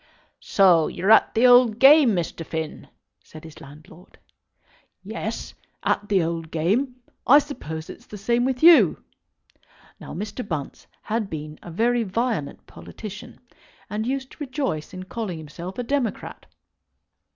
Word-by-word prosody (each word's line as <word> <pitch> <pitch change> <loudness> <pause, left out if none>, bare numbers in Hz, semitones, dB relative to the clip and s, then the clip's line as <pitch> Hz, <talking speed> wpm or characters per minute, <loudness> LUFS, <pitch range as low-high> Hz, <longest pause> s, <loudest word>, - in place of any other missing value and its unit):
"So 180 -5 +4
you're 190 +4 -1
at 220 - +5
the 230 +3 +4
old 245 -3 +6
game, 270 -3 +6
Mr. 170 -1 -3
Finn?" 160 -1 -6 0.4
said 155 - -13
his 160 -1 -13
landlord. 155 +5 -15 0.9
"Yes; - - -5 0.3
at 205 - -1
the 195 -4 +3
old 165 -1 -4
game. 210 - 0 0.3
I 280 - +8
suppose 160 - -4
it's - - -12
the 210 - -9
same 235 +4 0
with 255 +1 -2
you?" 300 - +6 1.0
Now - - -9
Mr. 210 +7 -5
Bunce 160 -8 -6 0.2
had 215 -2 -2
been 155 -1 -7
a - - -10
very 235 +7 +1
violent 220 - -3
politician, 215 +3 -11 0.5
and 215 +2 -3
used 265 0 -3
to - - -15
rejoice 265 - -3
in 185 0 -8
calling 190 -2 -5
himself 170 +4 -9
a 245 - -2
Democrat. 255 -3 -3
205 Hz, 140 wpm, -23 LUFS, 165-245 Hz, 1.0 s, I